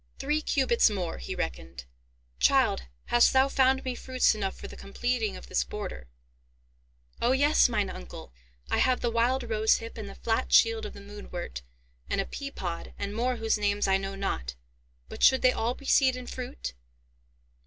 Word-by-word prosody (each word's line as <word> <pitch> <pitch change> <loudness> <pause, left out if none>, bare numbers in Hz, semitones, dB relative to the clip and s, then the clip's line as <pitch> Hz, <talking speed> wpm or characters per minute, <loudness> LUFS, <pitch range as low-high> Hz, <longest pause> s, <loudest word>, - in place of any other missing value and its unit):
"Three 300 +3 0
cubits 260 -6 +3
more," 185 -5 -3
he 60 - -5
reckoned. 65 +1 -5 0.5
"Child, 60 0 +3 0.3
hast 240 0 +6
thou 265 +1 +5
found 265 -1 +2
me 255 - -1
fruits 255 0 +1
enough 195 -3 -3
for - - -9
the - - -10
completing 225 +1 -2
of - - -11
this - - 0
border?" 65 - -7 1.1
"O 240 +2 +3
yes, 285 0 +4
mine 210 -4 0
uncle. - - -9 0.4
I - - +2
have 255 -1 +2
the 240 - 0
wild 245 +3 +1
rosehip, 225 0 0
and 205 -2 -6
the - - -10
flat 225 -1 -1
shield 455 -1 +4
of - - -10
the 200 - -11
moonwort, 200 - -7 0.5
and - - 0
a - - 0
pea 280 -1 -6
pod, 175 -10 -6
and 200 0 -4
more 250 +2 0
whose 225 -2 0
names 205 0 +1
I 190 0 +4
know 195 0 -5
not. 65 - -3 0.5
But - - -10
should 265 - +5
they 255 - +6
all 240 0 -1
be 275 - -14
seed 260 -2 +4
and 250 -1 -8
fruit?" 250 - -6
225 Hz, 180 wpm, -28 LUFS, 195-255 Hz, 1.1 s, hast